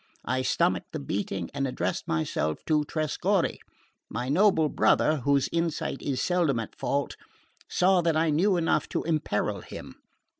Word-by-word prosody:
I 130 0 0
stomached 130 - 0
the - - -3
beating 95 +4 -3
and 135 - -1
addressed 125 - -2
myself 80 -1 -1
to 155 -2 +2
Trescorre. 155 -2 0 0.5
My 125 +1 -3
noble 160 0 +4
brother, 155 +1 +3
whose 140 0 +2
insight 165 -2 -2
is 135 -3 -2
seldom 170 -9 +1
at 110 - -6
fault, 140 0 -2 0.5
saw 185 0 +3
that 165 -2 +1
I 160 0 +2
knew 180 +5 +3
enough 165 -1 +1
to - - -2
imperil 105 - -1
him. - - -9
150 Hz, 150 wpm, -27 LUFS, 125-165 Hz, 0.5 s, noble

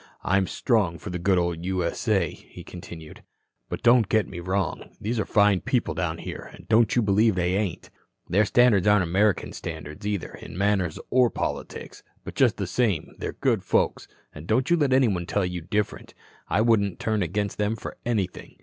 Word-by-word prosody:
"I'm 95 0 +2
strong 100 -9 +1
for 80 - -8
the 90 - -3
good 95 +2 +2
old 85 -1 -1
U.S.A.," 95 0 0
he - - -13
continued. 85 -3 -10 0.5
"But - - -5
don't 120 -3 +5
get 110 -4 +2
me 85 - -7
wrong. 95 +1 -2
These 115 +2 -2
are - - 0
fine 100 -3 +3
people 120 -10 0
down 80 0 -2
here, - - -7
and - - -16
don't 115 0 +3
you 120 - +3
believe 105 +1 +3
they 90 0 0
ain't. 100 -3 -2 0.4
Their 105 +4 +3
standards 105 -2 +4
aren't 105 -2 +5
American 95 +3 +1
standards 80 +5 -7
either 100 -5 -3
in 80 - -10
manners 95 -4 +1
or 125 -1 +4
politics. - - -5 0.2
But, - - -7
just - - +3
the - - -2
same, 110 -10 0
they're - - -4
good - - 0
folks, - - 0 0.3
and 80 +2 -10
don't 125 +7 +1
you - - +6
let 145 -4 +1
anybody 110 -10 +2
tell 100 -2 0
you 90 -1 -4
different. 105 +5 -3 0.3
I 110 - +2
wouldn't 105 -4 +2
turn 110 -2 0
against 100 +4 -2
them 105 +2 +1
for 110 - -8
anything. 105 -7 -3
100 Hz, 185 wpm, -25 LUFS, 90-110 Hz, 0.5 s, you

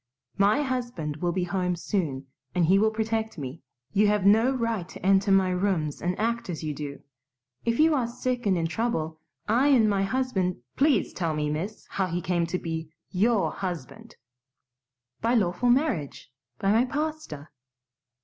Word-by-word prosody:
"MY 210 +9 +4
husband 240 - -3
will 175 +2 0
be 180 +1 -1
home 180 0 -1
soon 160 -7 -2 0.3
and 175 -2 +3
he 190 +4 +5
will 220 +1 +4
protect 220 -1 -2
me. 140 +1 -6 0.3
You 210 +1 +4
have 205 -2 +2
no 220 +5 +5
right 230 -8 -2
to - - -9
enter 195 +1 +4
my 190 -1 +4
rooms 180 -5 -1
and 180 +1 -1
act 235 0 -1
as 165 -2 -4
you 155 -1 -2
do. 140 -1 -7 0.6
If 230 0 0
you 315 +1 +5
are 255 -5 +1
sick 245 -1 -2
and 190 -2 +3
in 165 - 0
trouble, 160 -4 -2 0.3
I 245 +6 +3
and 250 -6 +5
my 200 -2 +2
husband 195 - 0
" - - -54
"Please 285 0 +2
tell 165 -3 -1
me, 150 0 -1
miss, 180 +8 -4
how 190 -1 -1
he 175 0 -2
became 175 -1 0 0.6
YOUR 210 +2 +2
husband?" 185 - -6 1.1
"By 235 +2 +2
lawful 205 +3 +1
marriage, 240 - 0 0.3
by 195 - +1
my 230 +4 +4
pastor." 285 - -4
195 Hz, 170 wpm, -27 LUFS, 170-235 Hz, 1.1 s, he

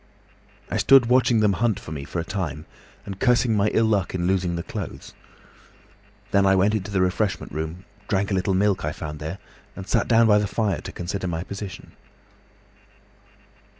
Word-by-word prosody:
"I - - 0
stood 135 -2 +6
watching 120 -2 +3
them 105 -2 +3
hunt 110 +1 0
for - - -10
me 70 -3 -5
for 85 - -4
a - - -1
time, 85 -7 -4 0.4
and 100 -1 -7
cursing 125 -2 +3
my 105 0 +2
ill 115 +1 +2
luck 100 -4 0
in 85 -1 -1
losing 90 -2 0
the 85 - -3
clothes. - - -7 1.2
Then 100 -1 +4
I 95 0 +4
went 100 +3 +3
into 105 -2 -2
the 100 -2 0
refreshment 95 +2 -1
room, 80 +5 -5 0.2
drank 100 +1 0
a - - +1
little 95 0 +1
milk 100 0 +1
I 75 +1 -2
found 75 -1 -7
there, 80 +5 -5 0.4
and 95 +1 -8
sat - - +1
down 115 -1 +5
by 105 -2 +5
the 105 - -1
fire 105 0 -1
to 95 - -7
consider 95 +1 -4
my 85 -1 -3
position. 100 0 -8
95 Hz, 185 wpm, -24 LUFS, 90-105 Hz, 1.2 s, stood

